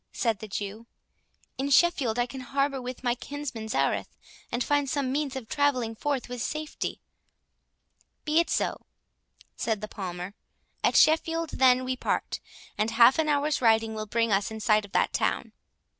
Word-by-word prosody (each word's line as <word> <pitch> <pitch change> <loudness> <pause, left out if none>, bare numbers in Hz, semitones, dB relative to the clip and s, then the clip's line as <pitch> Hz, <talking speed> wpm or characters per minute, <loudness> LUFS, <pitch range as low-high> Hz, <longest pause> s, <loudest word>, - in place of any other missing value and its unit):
said 225 -4 0
the 215 - -7
Jew; 210 +3 -5 0.7
"in 275 +1 -1
Sheffield 275 -6 +3
I 240 - +2
can 265 +1 -8
harbour 275 +1 -1
with 250 +1 -7
my 245 -1 +2
kinsman 255 -3 -6
Zareth, - - 0 0.3
and 240 +1 0
find 290 0 +1
some 270 -2 -1
means 285 -1 -1
of 260 -4 -6
travelling 265 -6 +1
forth 280 +2 -2
with 245 -1 -5
safety." 305 +5 -4 1.3
"Be 305 +1 +3
it 340 - +1
so," - - -1 0.7
said 220 -2 -1
the 215 - -5
Palmer; 180 -1 -6 0.5
"at - - +3
Sheffield 325 0 +3
then 255 -1 +4
we 255 0 -1
part, - - -2 0.4
and 215 +1 +2
half 235 +5 +6
an 310 -1 +2
hour's 295 0 +1
riding 225 -1 +3
will 215 0 -5
bring 230 +1 +1
us 195 0 +2
in 220 0 -7
sight 215 -1 +3
of 200 - -16
that - - +2
town." - - 0
250 Hz, 170 wpm, -27 LUFS, 220-285 Hz, 1.3 s, half